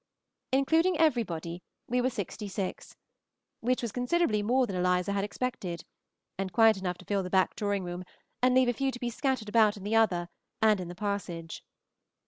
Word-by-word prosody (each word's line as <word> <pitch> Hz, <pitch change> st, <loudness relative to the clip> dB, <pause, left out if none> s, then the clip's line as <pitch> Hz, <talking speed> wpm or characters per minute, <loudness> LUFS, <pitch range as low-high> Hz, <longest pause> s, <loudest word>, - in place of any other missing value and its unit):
Including 320 Hz, +6 st, +3 dB
everybody 180 Hz, -, 0 dB, 0.3 s
we 250 Hz, +1 st, +1 dB
were 255 Hz, -, +2 dB
sixty 205 Hz, -2 st, -5 dB
six, 195 Hz, -1 st, -5 dB, 0.6 s
which 250 Hz, +1 st, 0 dB
was 235 Hz, -, -2 dB
considerably 245 Hz, -2 st, +1 dB
more 250 Hz, +5 st, +2 dB
than 195 Hz, -, -5 dB
Eliza 180 Hz, +1 st, +1 dB
had 200 Hz, 0 st, 0 dB
expected, 205 Hz, -6 st, -4 dB, 0.5 s
and 195 Hz, -1 st, -2 dB
quite 225 Hz, +3 st, +6 dB
enough 180 Hz, -2 st, -3 dB
to -, -, -14 dB
fill 200 Hz, -1 st, 0 dB
the 180 Hz, -, -5 dB
back 190 Hz, 0 st, +2 dB
drawing 205 Hz, -2 st, -1 dB
room 175 Hz, 0 st, -5 dB, 0.4 s
and 255 Hz, 0 st, +4 dB
leave 260 Hz, -1 st, +5 dB
a 245 Hz, -, +2 dB
few 270 Hz, +3 st, 0 dB
to 245 Hz, -, -8 dB
be 240 Hz, -1 st, -2 dB
scattered 260 Hz, -2 st, -1 dB
about 215 Hz, -1 st, +4 dB
in 195 Hz, -, -10 dB
the 210 Hz, +2 st, 0 dB
other 180 Hz, -6 st, +2 dB, 0.3 s
and 215 Hz, -2 st, +4 dB
in 180 Hz, -, -5 dB
the 175 Hz, -, -8 dB
passage. 180 Hz, -5 st, -4 dB
210 Hz, 185 wpm, -29 LUFS, 185-245 Hz, 0.6 s, quite